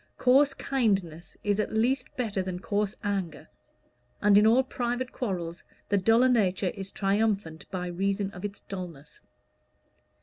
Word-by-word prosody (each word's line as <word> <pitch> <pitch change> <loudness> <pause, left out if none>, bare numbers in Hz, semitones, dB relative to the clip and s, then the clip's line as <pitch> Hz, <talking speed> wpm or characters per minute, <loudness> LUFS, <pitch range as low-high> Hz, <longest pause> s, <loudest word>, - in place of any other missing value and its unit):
Coarse 275 +2 +4
kindness 195 - -1
is 205 0 +1
at 215 - -1
least 250 +4 +1
better 215 -6 -1
than 185 -1 -4
coarse 205 +2 -1
anger; 195 -5 -3 0.7
and 210 -1 +4
in 210 +1 +7
all 245 +4 +5
private 250 -1 -3
quarrels 175 -8 -4 0.3
the 205 - +3
duller 225 +6 +4
nature 195 -6 +2
is 195 -1 -8
triumphant 195 -5 -1
by 180 -1 -3
reason 195 +3 -1
of 180 0 -10
its 200 -1 -5
dullness. 170 -7 -8
200 Hz, 140 wpm, -28 LUFS, 185-230 Hz, 0.7 s, in